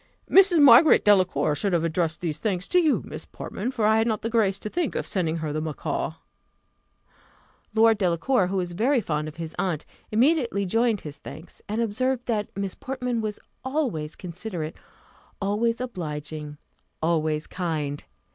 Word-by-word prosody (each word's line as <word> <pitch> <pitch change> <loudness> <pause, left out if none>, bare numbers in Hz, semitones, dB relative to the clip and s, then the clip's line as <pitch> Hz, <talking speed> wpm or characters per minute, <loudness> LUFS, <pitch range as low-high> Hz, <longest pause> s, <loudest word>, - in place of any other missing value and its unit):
"Mrs. 380 -3 +6
Margaret 275 +4 +7
Delacour 185 -6 +3
should 185 +6 -1
have 170 -2 +2
addressed 165 -1 -1
these 160 -4 -3
thanks 185 -2 -2
to 360 - +4
you, 315 -4 +2
Miss - - -7
Portman, 210 +6 -5
for 240 -5 -1
I 220 +1 +4
had 225 - +2
not 215 -3 -1
the 230 - -2
grace 205 -4 +2
to - - -4
think 335 +7 -2
of - - -2
sending 170 -4 -1
her 155 -2 -3
the 155 - -1
macaw." 155 -3 -3 1.6
Lord 225 -1 +5
Delacour, 185 +4 +2
who 195 +1 -2
was 180 -2 -2
very 240 +10 +2
fond 150 -7 -2
of 155 - -8
his 165 -1 -6
aunt, 180 -5 -1 0.3
immediately 235 -3 +2
joined 225 +2 +1
his 150 -1 -8
thanks, 160 - -11
and 215 +3 -1
observed 250 +3 -1
that 215 -3 -1
Miss 195 -2 -2
Portman 250 -3 -3
was 215 -1 -4 0.2
always 255 - -2
considerate 175 -2 -5 0.6
always 215 +4 0
obliging 150 - -5 0.5
always 155 -2 +1
kind. 155 -5 -3
195 Hz, 165 wpm, -25 LUFS, 160-230 Hz, 1.6 s, Margaret